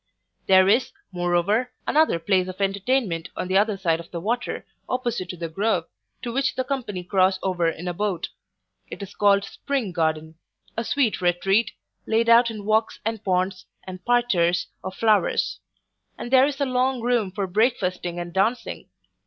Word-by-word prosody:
There 190 0 +6
is, 230 +6 +3 0.2
moreover, 180 +7 +1
another 310 - +3
place 185 +2 +1
of 185 +1 -8
entertainment 195 -2 0
on - - -2
the 190 +1 +2
other 210 -1 +1
side 165 -4 +1
of 170 - -10
the 170 - -5
water, 235 +7 -2 0.2
opposite 240 -7 -2
to 180 - -6
the 170 0 -4
Grove, 200 +7 0 0.4
to 240 -2 -4
which 270 0 0
the 260 - 0
company 235 -10 -4
cross 185 +1 +2
over 180 -3 +1
in 165 +2 -6
a 175 - -1
boat 190 -2 -2 0.6
It - - -7
is 200 - -9
called 200 -1 +3
Spring 260 -1 -3
garden; 160 -1 -2 0.4
a 230 - -1
sweet 235 -5 0
retreat, 195 +5 +2 0.3
laid 230 +1 +2
out 235 +1 +6
in 215 -3 -7
walks 220 +1 +1
and 225 -1 -2
ponds, 185 0 -1 0.2
and 185 -1 -8
parterres 200 -8 +2 0.2
of 190 - -6
flowers; 215 -2 +2 0.6
and 240 - -6
there 265 +1 +6
is 285 -1 -4
a 280 - +2
long 255 -1 0
room 240 -5 +1
for 195 +1 -3
breakfasting 185 -4 0
and 175 -1 -6
dancing. 225 +6 -1
200 Hz, 170 wpm, -24 LUFS, 180-235 Hz, 0.6 s, There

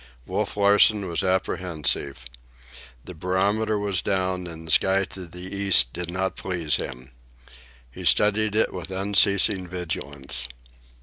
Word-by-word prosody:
Wolf - - -3
Larsen 100 0 +4
was 85 -1 -1
apprehensive. 85 -8 -2 0.8
The 90 - -7
barometer 100 +5 0
was 100 -3 0
down, 95 -2 -1
and 80 -1 -9
the 80 - -5
sky 95 +4 +4
to 95 -2 -9
the 90 +3 -9
east 95 -11 +3
did 90 0 -5
not 95 +1 -2
please 85 -5 -1
him. 65 +1 -7 0.8
He - - -9
studied 105 0 +3
it 110 - +2
with 90 0 -6
unceasing 100 0 +2
vigilance. 70 -7 -5
95 Hz, 130 wpm, -24 LUFS, 85-100 Hz, 0.8 s, Larsen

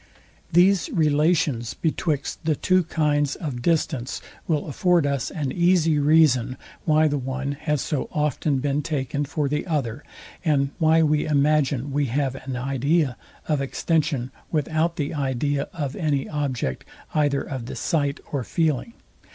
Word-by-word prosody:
These 185 - +4
relations 150 - +1
betwixt 155 -1 -2
the 155 -1 +1
two 185 +5 +3
kinds 145 -3 +1
of 135 -7 -5
distance 150 -5 0 0.3
will 155 -3 0
afford 170 +2 +2
us 140 -4 -1
an 145 -4 -3
easy 170 -3 +3
reason, 140 -5 +4 0.3
why 155 0 +4
the 145 -1 0
one 130 +1 -3
has 150 0 -1
so 150 -5 -2
often 150 -1 0
been 140 +2 0
taken 145 -2 -2
for 145 +1 -1
the 150 +5 -2
other, 145 -5 -2 0.4
and 140 -4 +2
why 160 0 +4
we 150 0 +2
imagine 145 -2 +2
we 145 +1 +1
have 135 +2 0
an 135 -1 -6
idea 135 +2 +1 0.3
of 150 -3 +1
extension 140 -2 0 0.2
without 160 +2 0
the 145 -4 -2
idea 140 0 -1
of 145 -5 -4
any 145 -4 0
object 130 - -2 0.3
either 145 -2 +2
of 130 -4 -6
the - - -6
sight 145 -3 0
or 140 -3 -1
feeling. 160 - -1
145 Hz, 145 wpm, -24 LUFS, 135-155 Hz, 0.4 s, These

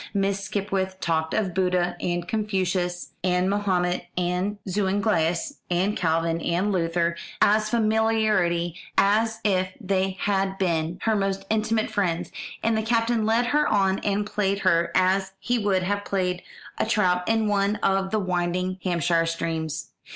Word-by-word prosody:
Miss 200 0 0
Skipwith 190 -2 -2
talked 160 -2 0
of 195 -5 0
Buddha, 180 -1 +1
and 175 -1 -2
Confucius, 185 -4 -1
and 180 0 +2
Mahomet, 180 -3 0
and 180 +3 -1
Zuinglius, 190 - 0
and 185 +4 +1
Calvin, 165 0 0
and 180 +6 0
Luther, 170 -2 0 0.2
as 215 +1 +3
familiarly 215 -6 +2 0.2
as 220 +3 +3
if 185 -3 +2
they 190 -2 -1
had 195 -1 0
been 170 -2 0
her 220 -1 +2
most 195 -1 -1
intimate 220 0 0
friends; 175 -5 -1 0.3
and 225 0 +2
the 220 - +1
Captain 230 0 +1
led 230 +2 +3
her 295 +5 +2
on 195 -2 +2
and 205 0 0
played 200 -1 -1
her 170 -2 +2
as 190 +1 +2
he 240 +5 0
would 195 -3 +1
have 205 +2 -1
played 180 -3 -1 0.4
a - - +2
trout 180 -5 +2
in 225 -1 +2
one 205 0 +1
of 195 0 +2
the 220 - 0
winding 185 -1 -1
Hampshire 170 -2 +1
streams. 160 -2 -3
190 Hz, 145 wpm, -25 LUFS, 175-210 Hz, 0.4 s, as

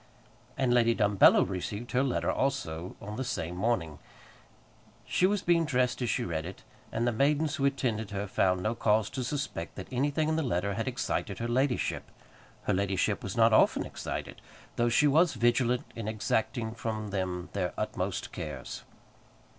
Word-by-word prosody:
And 130 -3 +2
Lady 115 -1 +4
Dumbello 105 -3 +5
received 100 +5 -4
her 125 - +2
letter 135 -2 0
also 95 -11 -2
on 105 +1 -7
the 130 - -1
same 90 -9 -3
morning. 90 -7 -1 1.1
She 185 - +3
was 205 0 0
being 170 -1 +3
dressed 130 -4 0
as 120 - 0
she - - 0
read 80 -2 -2
it, 90 +3 -9 0.3
and 115 +1 -1
the 120 - +2
maidens 145 +5 +1
who 135 - +1
attended 120 -6 0
her 100 0 -3
found 95 -2 +1
no 110 - +1
cause 110 -2 +1
to 130 - -3
suspect 130 - -4
that 95 - -7
anything 145 +4 +1
in 160 0 +1
the - - +1
letter 100 - 0
had 115 +4 -3
excited 120 -5 -2
her 115 - -3
ladyship. 130 +2 0 0.5
Her - - +1
ladyship 95 -1 0
was - - -5
not - - +5
often - - +4
excited, - - -6 0.3
though 120 0 +2
she 120 +6 +4
was 155 +4 +4
vigilant 120 +1 +2
in 115 -2 -5
exacting 110 +1 -1
from 110 -2 -4
them 90 -2 -3
their 95 -3 -1
utmost - - -3
cares. 75 -4 -6
115 Hz, 170 wpm, -29 LUFS, 100-130 Hz, 1.1 s, Dumbello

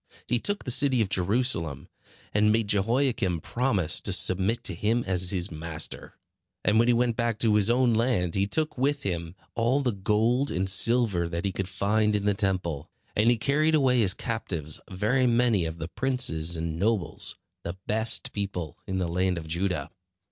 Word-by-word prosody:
He 120 0 0
took 205 - -1
the 125 - +2
city 130 0 +3
of 100 - -5
Jerusalem, 95 - -1 0.5
and 105 +1 +3
made 110 -1 +1
Jehoiakim 105 - +1
promise 105 - +1
to 100 - -2
submit 95 +4 +1
to 100 - -1
him 110 +7 0
as 90 -2 +1
his 90 -1 0
master. 80 0 -4 0.5
And 105 +2 +3
when 120 - +3
he 120 - +4
went 120 -1 +1
back 115 -2 -1
to 110 -1 +2
his 105 0 +4
own 120 0 +3
land 110 -7 0
he 100 0 +1
took 155 +4 -1
with 140 +2 0
him 85 -2 -4 0.2
all 120 +4 +1
the 130 -3 0
gold 110 +7 +1
and 95 +2 -1
silver 95 -2 +3
that 85 +2 -4
he 100 - 0
could 95 0 -4
find 105 +2 +1
in 100 -1 -1
the 105 - +3
Temple; 90 -7 -2 0.3
and 110 +3 +3
he 120 - +3
carried 150 +6 +2
away 130 -4 +3
as 95 -3 +3
captives 85 - -2
very 110 +8 +1
many 115 -6 +2
of 80 0 -5
the 80 - -5
princes 90 -10 0
and 80 0 -4
nobles, 105 -2 -1 0.2
the 85 +2 -6
best 110 +1 0
people 95 -3 -4
in 95 -1 -2
the 90 -2 -1
land 90 +1 0
of 80 - -6
Judah. 85 -2 -2
105 Hz, 185 wpm, -26 LUFS, 90-120 Hz, 0.5 s, he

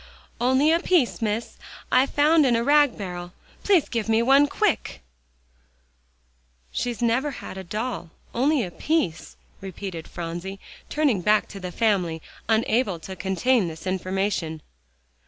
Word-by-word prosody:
"Only 260 +5 +3
a 335 - +4
piece, 345 -11 +1
Miss, 220 +1 -2 0.3
I 260 +2 +5
found 305 +3 +4
in 250 -4 +3
a 230 - +1
rag 290 -1 +4
barrel. 180 -3 -6 0.3
Please 380 -7 +3
give 225 -2 -2
me 225 +1 +3
one 275 +3 +5
quick." 380 - -1 1.7
"She's 240 - -3
never 240 +5 +2
had - - -8
a 190 - -6
doll 215 -1 -4 0.2
only 270 +2 +2
a 180 - -5
piece," 180 - -1 0.3
repeated 190 -3 -7
Phronsie, 175 +3 -6 0.3
turning 285 -11 +1
back 210 +3 +3
to 200 - -8
the 180 -1 -6
family, 180 -6 +1 0.3
unable 220 -3 +2
to 190 +4 -8
contain 195 +4 +1
this 160 +1 -8
information. 185 -3 -2
220 Hz, 135 wpm, -24 LUFS, 185-260 Hz, 1.7 s, I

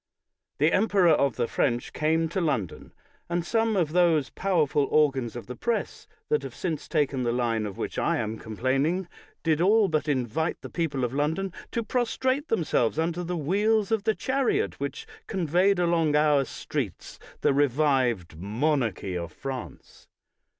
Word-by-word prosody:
The 155 +3 +3
emperor 195 -3 +4
of 140 -5 +2
the 115 - 0
French 120 +1 -1
came 160 +2 +1
to 185 +3 -1
London, 125 - -2 0.4
and 175 0 -1
some 225 +2 +1
of 165 -5 +1
those 165 -5 +3
powerful 155 -7 +1
organs 135 -6 +2
of 120 - -6
the 125 - -7
Press 235 - -3 0.2
that 450 0 +2
have - - -8
since 165 -5 -3
taken 145 -5 0
the 120 -1 0
line 115 -3 0
of 100 - -8
which - - -3
I - - +1
am 110 +1 -3
complaining, 135 - -1 0.4
did 160 -1 +2
all 210 +3 +5
but 155 -1 0
invite 140 +3 -1
the - - -9
people 145 -6 -1
of 125 0 -1
London 160 +6 -1 0.2
to 235 - -1
prostrate 260 +5 0
themselves 155 - +1
under 165 +2 -1
the 175 0 -3
wheels 205 +7 +1
of 220 -2 0
the 220 -1 +2
chariot 275 - 0
which - - -4 0.2
conveyed 180 +2 +2
along 170 -3 +2
our 150 -2 +4
streets - - -5 0.2
the - - +3
re\ived 130 - +1
monarchy 110 - -1
of 85 -2 -4
France. 130 +6 -8
155 Hz, 160 wpm, -26 LUFS, 130-185 Hz, 0.4 s, all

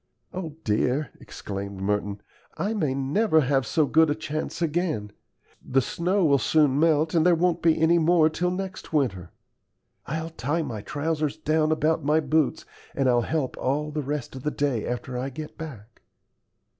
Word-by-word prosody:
"O 165 -5 -5
dear!" 125 +6 0
exclaimed 100 -1 -7
Merton, 100 +1 -2 0.3
"I 210 +3 -1
may 155 -11 0
never 155 +6 +2
have 135 -3 +1
so 155 - +2
good 160 +2 +4
a 145 - +1
chance 155 0 -4
again. 160 - -1 0.5
The 135 - +2
snow 180 +8 0
will 140 -3 +4
soon 145 -2 +3
melt, 160 0 +3
and 165 -2 +4
there 175 0 +5
won't 175 0 +1
be 165 -2 +3
any 165 +2 +4
more 165 -1 +4
till 175 +3 -1
next 190 +1 -5
winter. 100 - 0 0.8
I'll 160 +3 -3
tie 160 +3 -1
my 110 -8 -5
trousers 150 +3 -2
down 155 0 +1
about 155 0 +1
my 150 +2 +3
boots, 155 0 0 0.3
and 135 -1 +1
I'll 120 -1 +4
help 145 +1 -2
all 150 +3 -1
the 150 0 -2
rest 145 -2 -4
of 130 - -7
the 150 - -1
day 140 -7 -1
after 125 +1 -4
I 130 +2 -3
get 150 +3 -8
back." 120 -9 -10
150 Hz, 170 wpm, -25 LUFS, 130-160 Hz, 0.8 s, there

